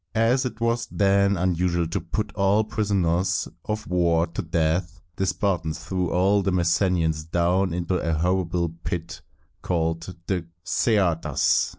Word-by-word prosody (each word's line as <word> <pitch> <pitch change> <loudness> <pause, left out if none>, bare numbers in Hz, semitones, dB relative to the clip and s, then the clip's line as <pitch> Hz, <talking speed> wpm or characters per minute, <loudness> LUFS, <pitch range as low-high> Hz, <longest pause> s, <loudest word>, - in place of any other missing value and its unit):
As 120 +4 +3
it 120 -3 -5
was 115 0 0
then 100 0 +2 0.2
usual 85 0 0
to 90 +2 -2
put 105 +6 -3
all 100 +1 +3
prisoners 95 -5 0 0.2
of 105 0 -3
war 85 -2 +2
to 85 - -5
death, 85 +2 -1 0.2
the 95 - -1
Spartans 85 -6 -1
threw 90 +2 -2
all 95 +3 +3
the 95 0 0
Messenians 85 -2 +1
down 90 +2 +1
into 90 +1 -1
a 85 -1 -1
horrible 85 +1 0
pit 85 -1 -4 0.4
called 80 0 -2
the 90 -4 -2 0.2
Ce´a 95 -8 +2
das. - - +2
90 Hz, 145 wpm, -24 LUFS, 85-100 Hz, 0.4 s, As